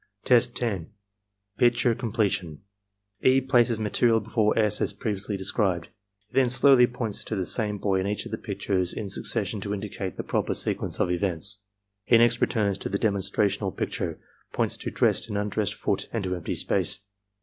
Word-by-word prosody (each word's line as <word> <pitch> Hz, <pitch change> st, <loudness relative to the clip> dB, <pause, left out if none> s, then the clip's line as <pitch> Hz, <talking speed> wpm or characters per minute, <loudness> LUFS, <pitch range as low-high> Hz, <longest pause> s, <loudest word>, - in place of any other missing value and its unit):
Test 120 Hz, -1 st, +4 dB
10. 100 Hz, -10 st, -2 dB, 0.3 s
— 100 Hz, 0 st, -52 dB
Picture 120 Hz, -1 st, +3 dB
Completion 100 Hz, -, -2 dB, 0.6 s
E. 130 Hz, +1 st, +5 dB
places 120 Hz, -4 st, +2 dB
material 110 Hz, +2 st, +2 dB
before 110 Hz, 0 st, 0 dB
S. 105 Hz, -2 st, +2 dB
as -, -, 0 dB
previously 100 Hz, -1 st, -3 dB
described. 95 Hz, -2 st, -1 dB, 0.4 s
He -, -, -35 dB
then 130 Hz, -2 st, +3 dB
slowly 130 Hz, 0 st, +6 dB
points 115 Hz, -4 st, -3 dB
to 110 Hz, -, -3 dB
the 95 Hz, -2 st, -1 dB
same 105 Hz, +2 st, +1 dB
boy 95 Hz, -1 st, 0 dB
in 95 Hz, -, -1 dB
each 105 Hz, +1 st, -2 dB
of -, -, -8 dB
the -, -, -3 dB
pictures 90 Hz, -2 st, -2 dB
in 105 Hz, -2 st, -4 dB
succession 100 Hz, +2 st, -2 dB
to 100 Hz, +1 st, -2 dB
indicate 95 Hz, -2 st, -5 dB
the -, -, -3 dB
proper -, -, -1 dB
sequence -, -, -2 dB
of 90 Hz, -, +1 dB
events. 95 Hz, +2 st, +1 dB, 0.4 s
He 115 Hz, -, +5 dB
next 120 Hz, +1 st, +4 dB
returns 100 Hz, -4 st, +1 dB
to -, -, -4 dB
the 100 Hz, -, 0 dB
demonstrational 100 Hz, -1 st, 0 dB
picture, -, -, -3 dB, 0.3 s
points -, -, 0 dB
to -, -, -5 dB
dressed 115 Hz, -, +1 dB
and 105 Hz, -, -2 dB
imdressed 105 Hz, 0 st, -1 dB
foot -, -, -2 dB
and 115 Hz, -3 st, -2 dB
to 90 Hz, -1 st, -2 dB
empty 90 Hz, -, -4 dB
space. -, -, 0 dB
105 Hz, 180 wpm, -26 LUFS, 100-115 Hz, 0.6 s, slowly